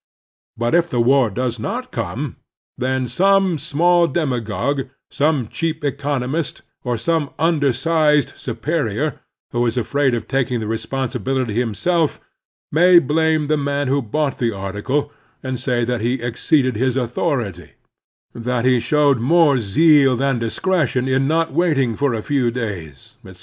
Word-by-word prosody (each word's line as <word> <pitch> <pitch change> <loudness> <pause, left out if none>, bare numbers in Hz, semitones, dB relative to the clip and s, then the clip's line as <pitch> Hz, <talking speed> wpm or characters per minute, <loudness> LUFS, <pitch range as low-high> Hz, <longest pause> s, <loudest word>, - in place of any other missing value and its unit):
But 120 +3 -1
if 170 0 +3
the 125 - -1
war 130 0 +4
does 120 +2 -3
not 110 - -4
come, - - -4 0.4
then 130 0 -1
some 190 - +2
small 170 +4 +2
demagogue, 135 -2 -2 0.2
some 145 -5 +1
cheap 160 +5 -3
economist, 140 +1 -2 0.2
or 125 -2 -1
some 155 +4 0
imdersized 150 0 +2
superior 135 +1 -2 0.3
who 120 0 0
is 115 - -2
afraid 130 +2 +1
of 115 - -5
taking 130 -2 0
the 110 - -4
responsibility 130 +1 -2
himself, 135 - 0 0.5
may 175 +4 +6
blame 160 0 +2
the 155 +1 +1
man 140 -1 -1
who 140 +1 +1
bought 140 +5 -2
the 120 -2 +1
article 105 +9 -3 0.3
and 130 -2 -3
say 120 -2 0
that 120 -1 -2
he 120 +3 0
exceeded 130 +2 0
his 130 +3 0
authority; 120 - -2 0.6
that 120 +1 -2
he 130 -1 +4
showed 145 0 +2
more 145 +1 +4
zeal 135 +5 +4
than 135 -1 0
discretion 130 +1 0
in 135 +1 +1
not 165 +2 0
waiting 140 -9 +1
for 140 -2 0
a 110 - -4
few 135 -5 +1
days, 100 - -6
etc. 95 -1 -13
135 Hz, 145 wpm, -20 LUFS, 120-150 Hz, 0.6 s, may